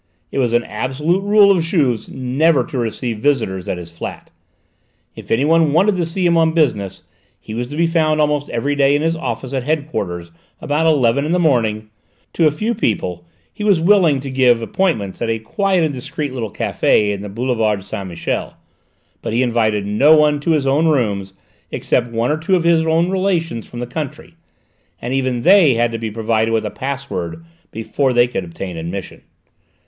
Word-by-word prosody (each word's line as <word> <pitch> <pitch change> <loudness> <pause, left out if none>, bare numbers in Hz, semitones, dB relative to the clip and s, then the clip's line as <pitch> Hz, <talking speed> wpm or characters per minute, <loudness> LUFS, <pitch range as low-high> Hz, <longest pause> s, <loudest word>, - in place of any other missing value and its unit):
It - - -2
was 120 -3 +1
an 120 0 +2
absolute 135 - -1
rule 205 0 +5
of 185 -3 +2
Juve's 145 - 0
never 135 +3 +1
to 135 - -6
receive 115 -1 -3
visitors 105 -9 -1
at 90 - -2
his 85 -1 -9
flat. 85 - -8 0.8
If - - -11
anyone 150 +5 +3
wanted 195 +5 +3
to 170 -2 -1
see 180 +2 -2
him 170 -1 +3
on 160 -1 +3
business, 115 - 0 0.4
he 110 - -9
was 120 +2 -3
to 145 - -8
be 170 +2 +2
found 160 -2 +1
almost 150 -1 0
every 130 +5 -1
day 140 0 +3
in 145 - 0
his 165 +1 +1
office 130 -3 -5
at 135 - 0
head 150 +2 -1
quarters 85 - -4 0.3
about 150 +3 0
eleven 140 -4 +3
in 155 +3 -1
the - - +3
morning; 110 -10 +1 0.4
to 165 - +3
a - - +2
few 215 +11 -2
people 90 - -2 0.3
he - - -6
was 200 -5 +3
willing 170 -5 +4
to 135 -1 -6
give 125 -3 +3
appointments 115 - -1
at 115 - -1
a 115 - 0
quiet 185 - 0
and 155 -2 0
discreet 135 +2 -5
little 115 -4 -4
café 105 +2 +1
in 100 - -6
the 105 - -7
boulevard 110 -2 -1
Saint 100 -1 -6
Michel; 85 -1 -4 0.6
but - - -4
he 120 +3 +2
invited 110 -4 0
no 140 +10 +5
one 150 -1 +3
to 145 - -4
his 150 -3 0
own 145 +4 +2
rooms 100 -10 0 0.3
except 120 - -1
one 115 +3 0
or 155 - 0
two 175 +4 +1
of 175 - +1
his 165 -1 +3
own 165 +3 +2
relations 175 - -1
from 120 - -9
the 120 - -3
country, 150 +4 -6 0.7
and 120 +2 -4
even 130 -3 -1
they 180 -9 +6
had 120 0 +1
to 115 - -4
be 110 -1 -3
provided 110 +1 0
with 115 -1 0
a - - -3
password 140 - -5 0.2
before 130 +4 -1
they 120 0 +5
could 120 - -3
obtain 90 +1 -7
admission. 85 +4 -6
135 Hz, 195 wpm, -18 LUFS, 115-160 Hz, 0.8 s, they